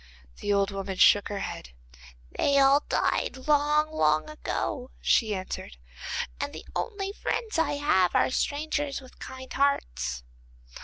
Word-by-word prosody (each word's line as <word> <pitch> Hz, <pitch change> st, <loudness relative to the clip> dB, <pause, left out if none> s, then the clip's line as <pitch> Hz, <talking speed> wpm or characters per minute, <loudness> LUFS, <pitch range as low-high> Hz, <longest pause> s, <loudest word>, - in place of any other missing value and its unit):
The 205 Hz, -, -2 dB
old 200 Hz, 0 st, +2 dB
woman 195 Hz, -1 st, -4 dB
shook 205 Hz, +2 st, +6 dB
her 205 Hz, -1 st, -4 dB
head. 60 Hz, -, -6 dB, 0.6 s
'They 280 Hz, -1 st, +2 dB
all 275 Hz, +1 st, +6 dB
died 260 Hz, -, 0 dB
long, 300 Hz, +1 st, +3 dB
long 155 Hz, -, +2 dB
ago,' 265 Hz, -4 st, -3 dB
she 220 Hz, -3 st, +2 dB
answered, 185 Hz, -, -6 dB, 0.6 s
'and -, -, -3 dB
the 160 Hz, -, -9 dB
only 400 Hz, -3 st, -2 dB
friends 435 Hz, -3 st, -2 dB
I 295 Hz, -3 st, +2 dB
have 285 Hz, -, +2 dB
are -, -, +3 dB
strangers 290 Hz, 0 st, -1 dB
with 260 Hz, -2 st, -16 dB
kind 260 Hz, 0 st, -8 dB
hearts. 60 Hz, -, 0 dB
260 Hz, 140 wpm, -27 LUFS, 195-295 Hz, 0.6 s, shook